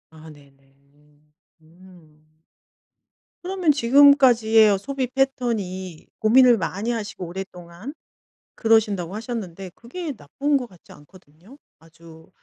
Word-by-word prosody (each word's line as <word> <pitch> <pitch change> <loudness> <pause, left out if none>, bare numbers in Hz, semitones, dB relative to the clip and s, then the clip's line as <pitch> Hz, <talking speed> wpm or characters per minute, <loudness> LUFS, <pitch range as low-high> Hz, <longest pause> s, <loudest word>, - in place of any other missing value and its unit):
아 160 0 -14
네네. 135 -2 -20 0.2
음. 150 +1 -31 0.3
음. 155 -2 -21 1.1
그러면 365 -3 +1
지금까지의 245 -5 +5
어 200 - +1
소비 265 +6 -4
패턴이 225 -10 -3
고민을 245 +2 +5
많이 200 +5 -3
하시고 210 -5 -5
오랫동안 180 - -9 0.6
그러신다고 210 -5 +1
하셨는데 195 -5 -7
그게 305 +6 -7
나쁜 275 - -2
것 250 -2 -6
같지 180 -6 -20
않거든요. 175 - -19 0.2
아주 165 0 -18
195 Hz, 255 characters per minute, -22 LUFS, 165-245 Hz, 1.1 s, 지금까지의